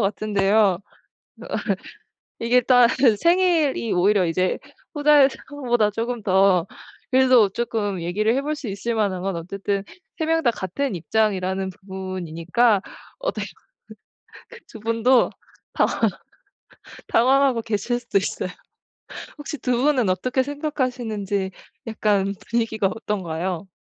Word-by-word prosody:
같은데요. 200 -2 +2 0.6
어. - - -9 0.9
이게 240 +2 +3
딱 245 -1 +5 0.3
생일이 335 - +2
오히려 190 +1 +3
이제 185 +3 0 0.3
후자의 295 -2 +5 0.2
상황보다 240 -7 +1
조금 230 +2 -3
더 190 -2 +3 0.4
그래도 255 -5 +5
조금 205 -4 -2
얘기를 210 +7 0
해볼 295 +3 -1
수 290 -5 -7
있을 200 +4 -3
만한 200 -5 0
건 190 -1 -2
어쨌든 195 +3 -3 0.3
3 320 - -1
명 325 0 +2
다 240 - +4
같은 210 +4 -3
입장이라는 190 +1 0
부분이니까 190 +2 0 0.4
어떻게 - - -3 1.0
그 475 - -13
그 - - -14
2 225 - -11
분도 230 +3 +3 0.4
당황 - - 0 1.1
당황하고 260 0 +3
계실 225 +2 -2
수도 235 -4 -1
있어요. 195 -1 -2 0.9
혹시 295 0 -6
2 250 -3 0
분은 260 -8 +2
어떻게 250 +8 0
생각하시는지 250 -9 -2 0.4
약간 205 -3 +1 0.2
분위기가 225 -3 +1
어떤가요? 190 -4 -3
220 Hz, 255 characters per minute, -23 LUFS, 195-255 Hz, 1.1 s, 딱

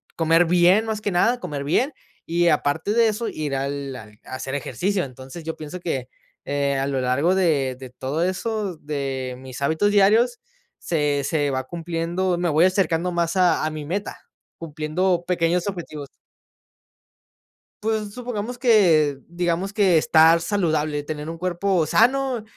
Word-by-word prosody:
comer 165 +1 +3
bien, 180 +5 +4
más 220 -1 -3
que 205 - -1
nada, 230 +8 +2
comer 150 -8 -5
bien 235 - +1 0.3
y 170 +1 +2
aparte 155 +6 0
de 230 0 +4
eso, 220 +2 -3
ir 150 -3 -3
al 140 0 -3
al 105 -3 -12
hacer 130 +1 -5
ejercicio, 185 +7 -1
entonces, 130 +5 -10
yo 160 0 -4
pienso 155 +4 -7
que, 135 -8 -3 0.4
eh, 140 -1 0
a 135 +1 -1
lo 135 -2 -1
largo 140 +9 +2
de 145 -9 +1
de 130 -1 -9
todo 135 +6 -3
eso, 190 0 -2
de 135 -4 -4
mis 130 0 -9
hábitos 160 +8 +2
diarios, 220 +5 +4 0.4
se 150 -4 0
se 145 0 0
va 130 -1 -2
cumpliendo 170 +2 -2
me 175 0 0
voy 155 +3 +4
acercando 180 -2 +1
más 170 0 -1
a 175 -4 +3
a - - 0
mi 155 -1 -6
meta, 195 +7 -4 0.4
cumpliendo 165 +3 -1
pequeños 175 +1 +1
objetivos. 155 -7 -6 1.7
Pues, 215 -1 -2
supongamos 245 -1 -4
que 170 - +4
digamos 175 +2 -1
que 190 -6 +4
estar 160 +1 +5
saludable, 155 -6 0
tener 150 0 -6
un 165 - -5
cuerpo 180 0 0
sano 255 - +2
165 Hz, 155 wpm, -23 LUFS, 145-190 Hz, 1.7 s, estar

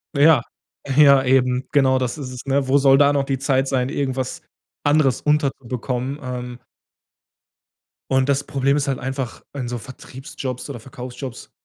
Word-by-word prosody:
Ja. 145 -2 +6 0.5
Ja, 140 -2 +7
eben. 130 -1 +2
Genau, 130 -2 +3
das 125 +1 -2
ist 135 -4 -6
es, 125 -1 -9
ne? 135 0 0
Wo 135 +2 +4
soll 135 -1 +5
da 145 0 +5
noch 140 -1 +1
die 135 -1 -1
Zeit 135 0 +1
sein, 130 -1 0
irgendwas 130 -3 -3 0.4
anderes 145 -3 +2
unterzubekommen. 135 -3 -1
Ähm 125 -1 -6 1.5
Und 130 0 +3
das 140 0 +1
Problem 140 0 0
ist 145 -1 0
halt 135 -2 0
einfach, 130 0 -5
in 130 -4 -4
so 120 - -3
Vertriebsjobs 130 +1 -7
oder 125 - -7
Verkaufsjobs, 125 +1 -9
135 Hz, 155 wpm, -21 LUFS, 125-140 Hz, 1.5 s, Ja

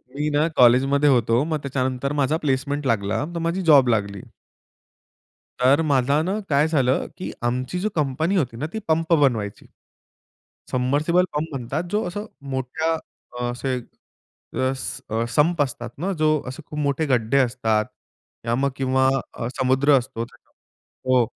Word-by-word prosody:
मी 150 +1 -1
ना 150 +2 +2
कॉलेजमध्ये 135 +4 +5
होतो. 120 0 +3
मग 155 -1 -1
त्याच्यानंतर 130 0 -2
माझा 145 +2 +1
प्लेसमेंट 145 0 -1
लागला 110 +2 0
तर 170 - -1
माझी 170 +3 -1
जॉब 145 -7 +6
लागली. 100 -3 0 1.4
तर 135 +4 +5
माझा 140 +1 +2
ना 190 +5 -1
काय 145 +1 +3
झालं 135 -5 +1
की 185 - -5 0.2
आमची 130 +8 -2
जो 210 - 0
कंपनी 155 +6 0
होती 125 -10 0
ना 145 - -3
ती 220 - -3
पंप 165 +1 +1
बनवायची. 120 -10 +1 1.1
सबमर्सिबल 145 +8 +2
पंप 150 +2 -1
म्हणतात 135 +5 -3
जो 210 +1 +1
असं 205 +4 -5 0.3
मोठ्या 130 +5 -1 0.5
अ, 125 - -2
असे 130 +1 -2 0.9
अस 130 -2 -4 0.3
अ, 115 +1 0
संप 150 +6 +2
असतात 125 -3 -2
ना, 180 +7 -2
जो 155 -3 +2
असे 130 +5 -7
खूप 150 - -6
मोठे 145 +2 0
गड्ढे 125 0 +2
असतात, 115 -4 +1 0.6
या 115 - +1
मग 140 +2 +1
किंवा 130 0 +2 0.3
अ, 115 - -4
समुद्र 135 +2 +4
असतो 120 -2 -3
त्याच्यामधू 130 +1 -5
हो, 120 - +3
135 Hz, 150 wpm, -23 LUFS, 125-155 Hz, 1.4 s, जॉब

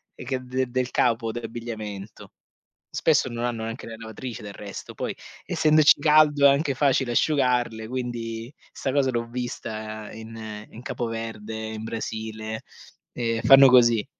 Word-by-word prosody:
che 130 +1 -3
de 130 +1 -1
del 125 0 -1
capo 115 -1 +1
d'abbigliamento. 110 -3 -7 0.6
Spesso - - +2
non 120 0 -3
hanno 120 -2 -2
neanche 115 +2 -6
le 115 - -7
lavatrici 115 +1 -7
del 105 - -7
resto, 100 -1 -8
poi, - - -3 0.3
essendoci 155 -1 +5
caldo 150 -1 +5
è 140 - +10
anche 140 0 +2
facile 135 -2 +2
asciugarle, 125 -6 +1
quindi 120 -1 -4 0.2
'sta 135 - -2
cosa 140 -2 +3
l'ho 115 -1 -2
vista 110 -3 -5
in 110 -1 -8
in 115 - -11
Capo 120 - -3
Verde, 115 -1 -5
in 110 0 -5
Brasile, 110 -1 -5 0.5
ehm, 115 -2 -1
fanno 135 0 +9
così. 120 -3 +5
115 Hz, 145 wpm, -25 LUFS, 110-130 Hz, 0.6 s, è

